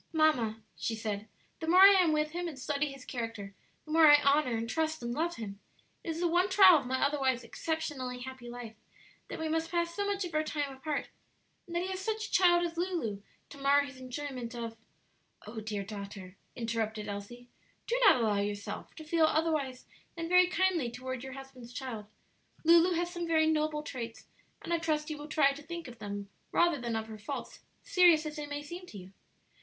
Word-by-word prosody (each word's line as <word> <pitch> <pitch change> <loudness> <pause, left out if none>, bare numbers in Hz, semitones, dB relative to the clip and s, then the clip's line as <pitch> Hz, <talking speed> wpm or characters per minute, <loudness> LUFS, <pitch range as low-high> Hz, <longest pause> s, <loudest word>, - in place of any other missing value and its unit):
"Mamma," 245 -9 +2
she 225 - -2
said, 215 -1 -4 0.3
"the 320 - -5
more 360 +3 +6
I 390 - +12
am 365 -5 +5
with 305 0 +1
him 350 +1 -3
and 310 -5 -7
study 285 +2 -1
his 275 -2 -11
character, 225 -5 -5 0.3
the 305 - -9
more 320 0 +7
I 295 0 +9
honor 280 -4 +3
and 225 +1 -3
trust 315 +2 -1
and 235 0 -2
love 335 +5 -1
him. 200 -3 -7 0.4
It - - -6
is 325 0 -2
the 350 - +2
one 355 +3 +2
trial 380 -4 +8
of 265 - -8
my 260 +1 0
otherwise 265 -4 +1
exceptionally 260 -2 -4
happy 260 -1 -8
life, 240 -2 -8 0.5
that - - -6
we 320 - -2
must 325 +1 -1
pass 340 0 0
so 405 - -1
much 400 -1 -1
of 340 - -7
our 310 0 +2
time 290 -3 -3
apart, 285 +2 -3 0.6
and 340 - -7
that 345 - +1
he 370 - -3
has 375 -1 -3
such 435 +1 -2
a - - -10
child 350 -1 +5
as 335 0 -5
Lulu 335 - -2 0.3
to - - -11
mar 280 +1 +4
his 280 -2 -7
enjoyment 255 -2 -6
of 230 -1 -5 0.4
" - - -27
"Oh, 220 +2 -6
dear 210 -2 -3
daughter," 200 -2 -8 0.2
interrupted 225 -2 -2
Elsie, 205 +5 -7 0.4
"do 475 - 0
not 405 - +8
allow 220 -4 +1
yourself 205 0 -4
to 315 - -9
feel 320 +1 +3
otherwise 310 -5 0 0.3
than 330 -1 -4
very 360 +1 +6
kindly 360 -7 +1
toward 255 +1 -6
your 265 -1 -7
husband's 265 -3 -11
child; 235 -6 -6 0.6
Lulu 340 +2 +6
has 345 +1 -1
some 345 -1 -4
very 320 -1 +4
noble 305 -1 +1
traits, 235 -6 -6 0.4
and 340 - -2
I 335 - +2
trust 310 -2 -1
you 300 - -5
will 295 - -7
try 295 -2 +4
to 280 +2 -8
think 340 +1 -7
of 240 -2 -11
them 205 -1 -5 0.2
rather 340 -6 +3
than 235 -1 -2
of 220 0 -2
her 220 -1 -9
faults, 270 +7 -6 0.2
serious 355 -9 +5
as 305 0 -5
they 295 -1 -4
may 290 0 -5
seem 350 +4 -8
to 210 - -10
you." 185 0 -11
290 Hz, 215 wpm, -31 LUFS, 235-330 Hz, 0.6 s, I